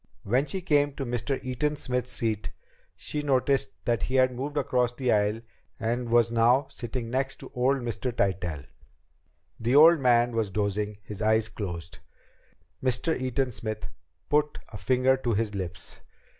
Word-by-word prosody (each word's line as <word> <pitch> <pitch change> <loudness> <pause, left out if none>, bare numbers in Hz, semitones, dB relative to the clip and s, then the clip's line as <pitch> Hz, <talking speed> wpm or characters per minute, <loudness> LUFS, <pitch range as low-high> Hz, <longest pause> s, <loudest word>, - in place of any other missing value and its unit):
When 125 +8 +1
she 190 +6 -3
came 145 -4 +2
to 135 - -4
Mr. 120 +3 -2
Eaton 130 +4 -1
Smith's 125 -3 -2
seat, 110 -7 -1 0.5
she 150 - -3
noticed 135 -6 +1
that 120 -4 +1
he 130 - -2
had 130 -1 +4
moved 145 +4 -4
across 125 -3 +1
the 125 -1 0
aisle 105 +1 +2 0.4
and 120 +1 -1
was 115 0 +4
now 120 +4 +4
sitting 120 -1 -5
next 135 +1 -1
to 135 - -10
old 130 +2 +1
Mr. 120 +1 -3
Tytell. 90 - -1 0.9
The 120 +4 +1
old 160 +3 +8
man 120 -2 +4
was 115 -3 -1
dozing, 105 +1 -1
his 105 -1 -7
eyes 110 0 +2
closed. 85 -5 -6 0.8
Mr. 130 +6 +1
Eaton 130 0 -1
Smith 110 -1 -5 0.4
put 150 0 +1
a 105 - -8
finger 130 +5 +3
to 120 -4 -1
his 105 0 -1
lips. 90 -4 -6
120 Hz, 155 wpm, -27 LUFS, 110-130 Hz, 0.9 s, old